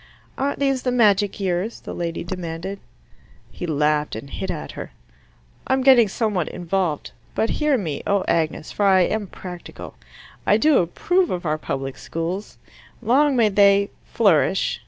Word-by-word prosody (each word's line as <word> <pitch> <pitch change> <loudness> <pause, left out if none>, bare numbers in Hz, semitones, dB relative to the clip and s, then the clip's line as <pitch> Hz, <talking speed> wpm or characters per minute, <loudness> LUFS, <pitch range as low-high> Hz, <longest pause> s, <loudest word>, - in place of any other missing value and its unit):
"Aren't 280 +2 -1
these 275 -2 +1
the 250 - -1
magic 210 -5 +3
years?" 190 +3 -2
the - - -7
lady 170 -1 -3
demanded. 175 +2 -5 0.7
He 175 - -6
laughed 150 -2 +1
and 140 +5 -8
hit - - -5
at - - -4
her. - - -8 0.7
"I'm 265 0 +1
getting 255 -4 +7
somewhat 200 -4 -1
involved. 175 -3 -2 0.2
But 225 - +1
hear 300 -3 +3
me, 160 - -3
O 200 -1 +2
Agnes, 160 -1 -1
for 205 - +1
I 190 -1 +5
am 210 +3 0
practical. 180 -1 -9 0.5
I - - +5
approve 310 - +2
of 180 0 -3
our 155 0 0
public 135 -2 -4
schools. 175 +5 -4 0.4
Long 265 +5 +3
may 230 -3 +4
they, 200 0 +4
flourish. 195 -3 +2
195 Hz, 150 wpm, -22 LUFS, 170-230 Hz, 0.7 s, getting